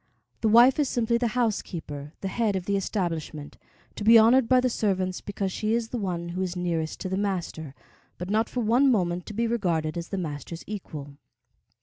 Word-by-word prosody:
The 225 - +1
wife 240 +6 +6
is 285 -3 +2
simply 235 0 +1
the 240 0 -1
housekeeper, 165 -10 -2
the 195 - -2
head 215 0 0
of 185 -2 -3
the 200 - 0
establishment, 165 -7 -3 0.4
to - - -5
be 225 +2 +8
honored 230 +2 +5
by 255 -1 +6
the 250 - +2
servants 190 -6 -1
because 195 -1 -3
she 215 +4 0
is 230 -1 -2
the 245 - -3
one 175 -4 -3
who 180 +2 -3
is 185 -1 -2
nearest 170 -3 -2
to 185 - -3
the 190 - -1
master, 175 -7 -3 0.4
but 180 - -5
not 220 +3 +1
for 250 - -2
one 240 +5 +4
moment 180 -6 0
to 210 - -7
be 235 +2 +1
regarded 175 -8 -1
as 170 - -6
the 195 - -3
master's 165 -1 -5
equal. 150 -9 -7
195 Hz, 205 wpm, -26 LUFS, 170-230 Hz, 0.4 s, be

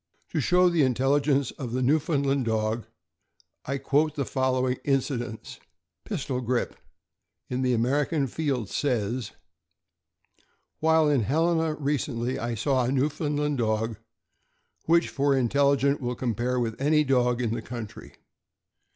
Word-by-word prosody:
To - - -1
show 180 0 +4
the 170 -3 +2
intelligence 135 +1 +2
of 125 -4 -5
the 130 +1 0
Newfoundland 140 -1 +1
dog, 110 0 -1 0.8
I 140 +1 -1
quote 145 +3 +1
the 140 -3 -1
following 130 -1 0
incidents. 130 -5 -2 0.2
" - - -60
Pistol 130 -2 -3
Grip," 125 0 -1 0.8
in 125 +1 -1
the 125 -1 +2
American 140 +5 +1
Field, 135 -4 -2
says: 120 -2 -2 1.5
While 160 0 +4
in 145 -4 +3
Helena 160 +5 +1
recently, 130 -4 -2
I 120 0 -2
saw 130 +3 +1
a 125 - 0
Newfoundland 145 +1 0
dog 110 -1 0 0.9
which 170 +1 +3
for 140 0 +1
intelli 140 +2 +3
gence 140 +1 +1
will 125 -1 -3
compare 125 +1 -1
with 115 0 -3
any 150 +2 +3
dog 125 -3 +2
in 115 -3 -1
the - - -3
country. 120 -4 -8
130 Hz, 135 wpm, -26 LUFS, 120-145 Hz, 1.5 s, show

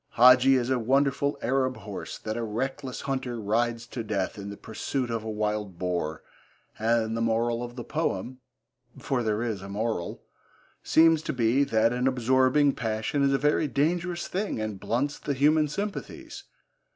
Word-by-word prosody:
Hadji 125 +2 +7
is 125 0 0
a 130 - +2
wonderful 140 +4 +1
Arab 130 0 +1
horse 100 -2 -7
that 110 0 -5
a 120 - -2
reckless 130 +4 -3
hunter 130 -3 -3
rides 115 +2 0
to 120 0 -6
death 100 -3 -2
in 100 -1 -7
the 100 - -8
pursuit 120 +3 -3
of 115 -1 -2
a 110 - -5
wild 105 -3 -2
boar, 85 -4 -2 0.6
and 115 0 +1
the 115 - -2
moral 115 +1 +1
of 120 0 -6
the 120 - -6
poem 130 -4 -2 0.6
for 130 -3 -1
there 110 0 0
is 110 -5 -3
a 95 - -8
moral 105 -3 -3 0.6
seems 165 -1 +5
to - - -3
be 125 +2 +2
that 115 -2 +2
an 125 +1 0
absorbing 130 +3 +3
passion 110 +4 -2
is 140 0 +3
a - - +4
very 150 +2 +2
dangerous 170 +6 -1
thing 195 - -2
and 110 -2 -4
blunts 140 +8 -1
the 140 - -2
human 150 +3 +4
sympathies. 200 +8 -6
120 Hz, 170 wpm, -27 LUFS, 110-135 Hz, 0.6 s, Hadji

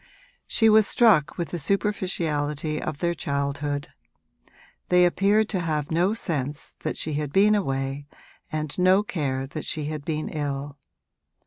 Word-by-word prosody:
She 225 - +3
was 215 -1 +6
struck 210 - +4
with 170 -2 -3
the 175 - -4
superficiality 155 -5 -1
of 155 - -4
their 170 +2 0
childhood; 145 -1 -2 1.0
they 180 0 +6
appeared 200 +4 +3
to 190 - -1
have 155 -3 -2
no 180 +6 +2
sense 145 - -3
that - - -3
she 155 - -2
had 145 -1 -2
been 205 +5 +5
away 135 -6 -1 0.4
and 155 -1 -3
no 185 +3 +5
care 135 -9 -2
that 145 +3 -6
she 155 -2 -3
had 150 -1 -4
been 155 0 -2
ill. 145 -1 -4
155 Hz, 145 wpm, -25 LUFS, 145-185 Hz, 1.0 s, was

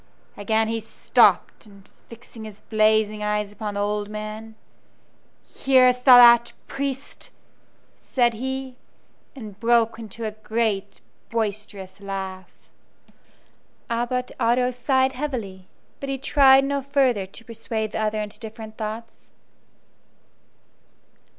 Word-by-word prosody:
Again 220 +2 0
he 225 0 -2
stopped, 220 0 +2
and 200 -2 -18 0.2
fixing 230 -1 -12
his 210 -1 -11
blazing 215 -1 +1
eyes 210 -1 -1
upon 210 0 -6
the 205 - -1
old 205 0 -2
man, 215 +1 -7 0.9
"Hearest 255 -2 +3
thou 255 -2 +10
that, 235 -1 +7
priest?" 275 -1 -5 0.7
said 240 -2 +1
he, 265 +2 -5 0.6
and 210 -6 -10
broke 230 -1 +2
into 225 0 -7
a 215 - -2
great 215 -2 -3 0.3
boisterous 210 -3 -4
laugh. 190 -2 -6 1.4
Abbot 245 +2 -2
Otto 250 +2 +2
sighed 260 +1 +1
heavily, 235 -10 -5 0.3
but 275 - -6
he 270 - -2
tried 270 0 +5
no 280 0 -1
further 260 -8 +1
to 225 +4 -10
persuade 225 -2 -4
the - - -4
other 215 0 -1
into 210 0 -10
different 220 -1 -10
thoughts. 225 +1 -7
225 Hz, 115 wpm, -23 LUFS, 210-250 Hz, 1.4 s, thou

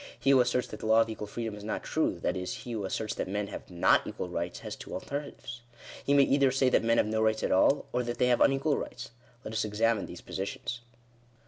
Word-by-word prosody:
He 135 +3 +3
who 135 - +6
asserts 125 0 +1
that 110 - -8
the - - -4
law 110 +1 +6
of 115 - 0
equal 105 -1 -6
freedom 115 +1 -4
is 105 0 -9
not 110 - -3
true, - - 0
that 90 - 0
is, 90 0 -3
he 120 - -6
who 110 -4 -3
asserts 110 +2 -2
that - - -3
men 100 +1 -2
have - - -8
not 85 -1 +3
equal 90 - -5
rights, 85 0 -4
has - - -6
two - - -8
alternatives. 140 -4 -6 0.4
He 140 - +2
may 140 - +7
either 140 0 +4
say 130 0 +2
that - - +3
men 115 0 +3
have - - +4
no 110 +1 0
rights 110 0 +1
at - - 0
all, 135 +9 +4
or 125 - +1
that 120 0 -4
they - - +3
have 120 - +3
unequal 135 +2 +3
rights. - - -7 0.3
Let 110 - -6
us 110 - 0
examine 110 0 +1
these - - -9
positions. 100 +4 -4
115 Hz, 250 wpm, -29 LUFS, 105-125 Hz, 0.4 s, may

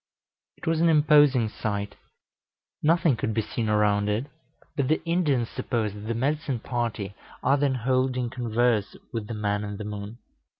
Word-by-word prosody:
It - - -11
was 160 0 +1
an 170 - +5
imposing 145 -6 +5
sight. 105 -1 -3 0.9
Nothing 165 -2 +3
could 110 -1 -2
be 110 - +1
seen 110 0 -3
around 105 -1 +2
it; 105 +5 0 0.5
but 140 -3 0
the 155 +3 +2
Indians 155 -9 +1
suppose 110 -4 -2
that 105 +1 -8
the 115 - -1
medicine 140 +2 0
party 115 -5 -3 0.3
are 135 +2 +4
then 140 -2 +1
holding 130 0 0
converse 120 -3 +1 0.2
with 110 -3 -3
the 115 - -4
man 105 -1 -1
in 105 -1 -5
the 105 - -5
moon.... 105 +2 -6
120 Hz, 165 wpm, -26 LUFS, 105-140 Hz, 0.9 s, an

